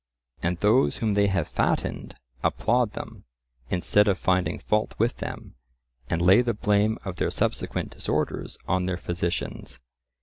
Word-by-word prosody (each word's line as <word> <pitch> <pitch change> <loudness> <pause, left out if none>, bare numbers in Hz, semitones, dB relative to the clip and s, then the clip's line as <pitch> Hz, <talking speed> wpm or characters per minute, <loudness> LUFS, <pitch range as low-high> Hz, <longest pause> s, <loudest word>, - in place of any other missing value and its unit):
And 90 +1 0
those 110 +8 +3
whom 110 -3 0
they 100 0 +3
have 95 -1 0
fattened - - -1 0.3
applaud 120 -1 +1
them, - - -8 0.4
instead 105 +3 +3
of 100 -2 +3
finding 95 0 +1
fault 105 0 0
with 115 +3 +1
them, - - -7 0.6
and 85 0 0
lay 95 +6 +7
the 120 -3 -1
blame 105 +1 +2
of 95 -2 -5
their - - +1
subsequent - - -2
disorders - - -2
on 90 0 +1
their 90 -1 -1
physicians. 85 -6 -4
100 Hz, 145 wpm, -26 LUFS, 90-110 Hz, 0.6 s, lay